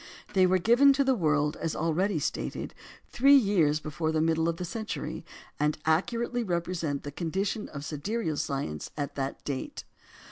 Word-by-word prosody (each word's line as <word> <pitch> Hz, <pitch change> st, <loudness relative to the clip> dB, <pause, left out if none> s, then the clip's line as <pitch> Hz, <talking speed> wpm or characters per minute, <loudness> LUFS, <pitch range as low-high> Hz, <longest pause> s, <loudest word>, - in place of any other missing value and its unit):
They 185 Hz, -1 st, +5 dB
were 185 Hz, +1 st, +3 dB
given 240 Hz, +9 st, +5 dB
to 275 Hz, +1 st, +2 dB
the 265 Hz, -1 st, +3 dB
world, 150 Hz, -, +1 dB
as 165 Hz, -, -3 dB
already 165 Hz, +4 st, +1 dB
stated, 145 Hz, -, -3 dB, 0.4 s
three 275 Hz, +3 st, +6 dB
years 185 Hz, -, +3 dB
before 155 Hz, +1 st, -2 dB
the 160 Hz, -, +1 dB
middle 160 Hz, +1 st, +2 dB
of 165 Hz, -, -2 dB
the 180 Hz, -, -4 dB
century, 220 Hz, +5 st, -5 dB, 0.4 s
and 150 Hz, 0 st, +1 dB
accurately 235 Hz, +9 st, +1 dB
represent 170 Hz, -6 st, -2 dB
the 145 Hz, -, -6 dB
condition 190 Hz, +7 st, -2 dB
of 140 Hz, 0 st, -7 dB
sidereal 160 Hz, +2 st, -2 dB
science 135 Hz, -, -3 dB
at 145 Hz, -1 st, -3 dB
that 135 Hz, 0 st, -4 dB
date. 135 Hz, -2 st, -4 dB
165 Hz, 165 wpm, -28 LUFS, 150-205 Hz, 0.4 s, three